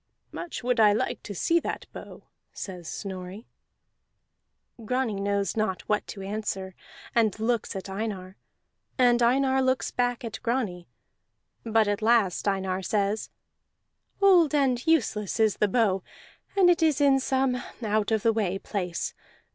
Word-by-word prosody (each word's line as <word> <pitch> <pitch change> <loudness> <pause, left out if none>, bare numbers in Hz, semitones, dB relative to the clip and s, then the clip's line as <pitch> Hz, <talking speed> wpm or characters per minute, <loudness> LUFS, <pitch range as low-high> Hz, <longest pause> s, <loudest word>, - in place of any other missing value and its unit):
"Much 345 - -6
would 250 -1 +1
I 210 -2 +6
like 210 - -2
to 205 - -8
see 335 - +2
that - - -5
bow," - - -10 0.3
says 180 -4 -7
Snorri. 190 +2 -7 1.4
Grani 235 -3 -1
knows 200 -2 -1
not 215 -4 -1
what 210 0 0
to 195 - -7
answer 195 -2 -4 0.4
and 220 -4 +2
looks 230 -1 -1
at 190 +1 -5
Einar, 195 -2 -5 0.6
and 245 -2 +4
Einar 265 +2 +3
looks 260 0 0
back 245 0 -1
at 225 - -6
Grani; 215 -8 -2 0.8
but 225 -1 +2
at 205 0 -1
last 220 -5 +2
Einar 190 -1 0
says: 205 +2 -1 0.9
"Old 360 -7 +5
and 260 -3 +1
useless 225 - +1
is 220 -2 +3
the 210 - +2
bow, 200 -3 +2 0.6
and 380 -2 +6
it 350 -1 +4
is 310 -3 +3
in 275 -2 +4
some 260 -1 0 0.2
out 215 -1 +1
of 220 -2 0
the 230 - +3
way 195 -4 0
place. 180 -4 -3
220 Hz, 145 wpm, -27 LUFS, 195-250 Hz, 1.4 s, I